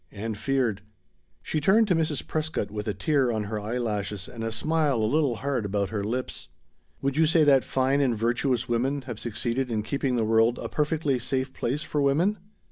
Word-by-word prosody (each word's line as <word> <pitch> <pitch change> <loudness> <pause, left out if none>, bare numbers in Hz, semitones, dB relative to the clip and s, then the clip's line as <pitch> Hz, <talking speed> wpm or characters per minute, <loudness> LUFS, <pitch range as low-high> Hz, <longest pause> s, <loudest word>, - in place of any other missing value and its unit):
And 110 +1 -4
feared. 120 -2 0 0.6
She 155 - -1
turned 210 +8 +4
to 180 - +4
Mrs. 155 -3 -1
Prescott 155 -10 -2
with 105 0 -5
a 105 - 0
tear 140 -6 +2
on 110 -2 -1
her 105 +1 -3
eyelashes 105 -3 -3
and 115 -2 -7
a 115 - -2
smile 150 +5 +1
a 110 -2 +1
little 140 +1 +2
hard 130 +1 -2
about 100 -1 -1
her 105 -2 -2
lips. 125 +5 -3 0.6
"Would 135 0 0
you 160 0 +5
say 160 0 +4
that 140 -3 +5
'fine 135 +2 +1
and 125 -5 +1
virtuous 120 +2 0
women' 130 +4 0
have 120 -4 -7
succeeded 120 +3 -2
in 110 -2 -1
keeping 135 +2 -1
the 115 -2 +1
world 115 +2 +3
a - - -5
perfectly 150 -3 0
safe 130 +2 -1
place 140 +6 -2
for 150 -1 -1
women?" 165 +9 +2
125 Hz, 200 wpm, -26 LUFS, 110-145 Hz, 0.6 s, you